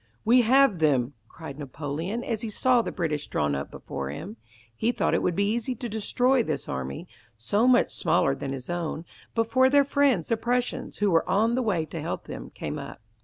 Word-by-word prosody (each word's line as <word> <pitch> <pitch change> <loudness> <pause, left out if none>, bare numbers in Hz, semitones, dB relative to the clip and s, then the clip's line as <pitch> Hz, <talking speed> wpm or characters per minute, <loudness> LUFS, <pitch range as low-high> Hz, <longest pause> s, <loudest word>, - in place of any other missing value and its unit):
"We 245 +3 +6
have 255 -4 +4
them," 140 -4 +2
cried 155 -1 -10
Napoleon 155 - -4
as 230 -3 -3
he 230 - -3
saw 250 +3 +3
the - - -4
British 150 -4 -2
drawn 75 -1 0
up 70 0 -3
before 70 -1 -6
him. 75 +9 -7 0.4
He 225 - +1
thought - - 0
it - - +2
would 175 - 0
be 200 +2 +1
easy 240 +2 -2
to 240 - -5
destroy 245 +4 +1
this 155 - -3
army, 65 0 -5 0.3
so 205 - +1
much 250 -1 +4
smaller 135 - +2
than 135 0 -5
his 130 -2 -6
own, 170 -2 -3 0.3
before 255 +3 +3
their 285 +1 +5
friends 275 - +2
the 230 - +2
Prussians, 245 +2 -2
who 205 -1 +2
were 165 -1 +2
on 225 +4 +3
the 255 - +1
way 190 -9 0
to - - -6
help - - -4
them, - - -7
came - - -5
up. - - -8
200 Hz, 205 wpm, -26 LUFS, 145-240 Hz, 0.4 s, We